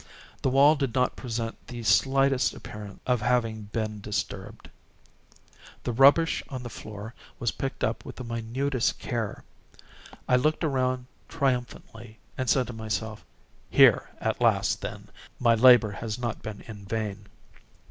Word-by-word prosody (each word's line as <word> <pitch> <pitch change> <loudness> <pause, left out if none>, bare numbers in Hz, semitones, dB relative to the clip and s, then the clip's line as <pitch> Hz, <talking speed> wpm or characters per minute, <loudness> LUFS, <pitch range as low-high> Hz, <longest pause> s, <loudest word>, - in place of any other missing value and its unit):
The - - +1
wall 140 +4 +6
did 135 -5 -2
not 125 -1 +2
present 115 -2 -5
the 120 -2 -7
slightest 135 +7 +3
appearance 105 -2 -9
of 125 -3 +1
having 110 -3 0
been 110 -2 -3
disturbed. 105 +1 -5 1.2
The - - -1
rubbish 140 +7 +5
on 130 -4 -6
the 120 - -7
floor 105 +2 -8 0.2
was 120 - 0
picked 135 0 -5
up 110 - -1
with - - -9
the 130 - -7
minutest 120 +3 -1
care. 115 -4 -4 0.8
I 125 - +4
looked 155 +6 +1
around 130 -4 0 0.2
triumphantly, 125 -5 -3 0.2
and 130 -2 -2
said 130 -2 +3
to 120 - -7
myself: 110 -1 -4 0.5
"Here - - +5
at - - -2
least, - - +2
then, - - -7 0.3
my 120 -2 +4
labor 115 -2 +7
has 110 +2 -5
not 120 -2 -4
been 110 -2 -7
in 105 -3 -10
vain." 105 -1 -4
120 Hz, 145 wpm, -27 LUFS, 110-130 Hz, 1.2 s, labor